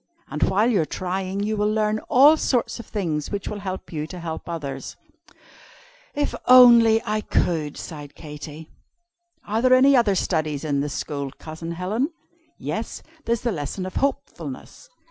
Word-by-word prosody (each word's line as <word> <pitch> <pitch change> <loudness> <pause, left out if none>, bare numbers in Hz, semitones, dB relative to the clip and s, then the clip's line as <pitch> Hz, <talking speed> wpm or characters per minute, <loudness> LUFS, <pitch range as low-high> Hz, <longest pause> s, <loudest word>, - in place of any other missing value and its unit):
And 150 - -4
while 205 +7 +3
you 225 -8 +3
are - - 0
trying, 185 +3 -3
you 215 +1 -1
will 210 0 +1
learn 215 0 +1
all 285 +5 +7
sorts 240 -6 0
of 235 - -9
things 165 -8 -2
which 200 -1 -4
will 210 - -4
help 190 -2 -6
you 155 -1 -3
to 180 +2 -8
help 165 0 -6
others." 150 -5 -5 1.2
"If 290 0 -1
I - - -6
only 235 -3 +8 0.3
could!" 155 -4 0
sighed 145 -4 -8
Katy. 150 0 -9 0.7
"Are 215 +2 -1
there 255 +1 +5
any 270 +2 +6
other 225 -6 +3
studies 155 -5 -1
in 145 -3 0
the 145 +1 -1
School, 140 -1 -4
Cousin 165 +1 -7
Helen?" 205 - -1 0.5
"Yes, - - -5 0.2
there's 230 -1 0
the 240 - 0
lesson 165 +2 -4
of 185 - -6
Hopefulness. 280 - -4
190 Hz, 165 wpm, -23 LUFS, 155-230 Hz, 1.2 s, only